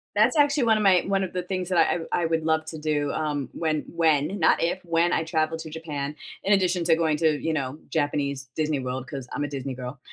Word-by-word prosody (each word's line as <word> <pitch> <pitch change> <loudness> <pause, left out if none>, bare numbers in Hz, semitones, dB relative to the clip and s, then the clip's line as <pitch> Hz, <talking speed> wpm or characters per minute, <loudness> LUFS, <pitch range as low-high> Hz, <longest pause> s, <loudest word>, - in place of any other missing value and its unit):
That's 220 +8 +4
actually 285 -2 +4
one 220 -2 +4
of 210 - 0
my 185 -3 +5
one 195 0 +1
of 185 - -9
the 180 - -2
things 185 0 -3
that 180 - +1
I 175 +1 +1
I - - +1
would 165 -1 0
love 160 0 +2
to 160 - -6
do, 150 -2 -1
um, 145 -4 -2
when 155 -2 -1
when 160 +2 +2
not 160 - +3
if, 170 +2 0
when 170 +1 +2
I 165 - +1
travel 160 0 0
to 160 -1 -8
Japan, 150 -2 -5 0.3
in 205 - +4
addition 180 -3 +2
to 165 - +5
going 160 -2 +1
to, 155 -2 +2
you 165 - 0
know, 140 -1 -2
Japanese 140 -3 -1
Disney 155 -2 0
World, 130 0 -4
'cause 135 -3 -6
I'm 145 - -1
a 145 - -2
Disney 135 -1 -4
girl, 125 +2 -7
160 Hz, 245 wpm, -25 LUFS, 145-175 Hz, 0.3 s, my